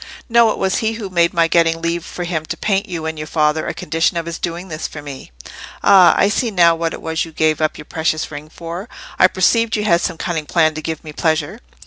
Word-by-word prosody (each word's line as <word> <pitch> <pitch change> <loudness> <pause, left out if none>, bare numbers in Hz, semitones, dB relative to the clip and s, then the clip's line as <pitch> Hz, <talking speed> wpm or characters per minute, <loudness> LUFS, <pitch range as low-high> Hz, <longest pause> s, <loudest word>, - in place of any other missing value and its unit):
"No, 235 -1 +5
it - - -2
was 190 -1 0
he 220 0 0
who 215 -4 -6
made 170 -1 +3
my 170 -1 +2
getting 165 -1 +2
leave 170 0 -2
for 175 - -6
him 170 -3 -2
to - - -4
paint 200 0 -1
you 165 -3 -4
and 160 -1 -4
your 155 - -5
father, 155 0 +1
a - - -2
condition 165 +3 0
of 165 - -2
his 170 0 -5
doing 175 +2 -4
this 155 -3 -4
for 150 - -9
me." 140 -2 -9 0.5
"Ah! 190 -3 +7
I - - +4
see 230 +3 0
now 175 -5 +4
what 165 0 -2
it - - -12
was 160 0 -1
you 165 - -9
gave 155 0 +1
up 155 - 0
your 150 - -10
precious 155 -1 -2
ring 145 +1 -8
for. 170 +7 -7 0.3
I 185 - +7
perceived 220 +5 +2
you 210 - -1
had 170 -4 +3
some - - -2
cunning 160 -4 -3
plan 160 -1 +2
to 155 - -6
give 160 0 -5
me 155 -1 -9
pleasure." 160 +5 -1
170 Hz, 255 wpm, -18 LUFS, 155-185 Hz, 0.5 s, Ah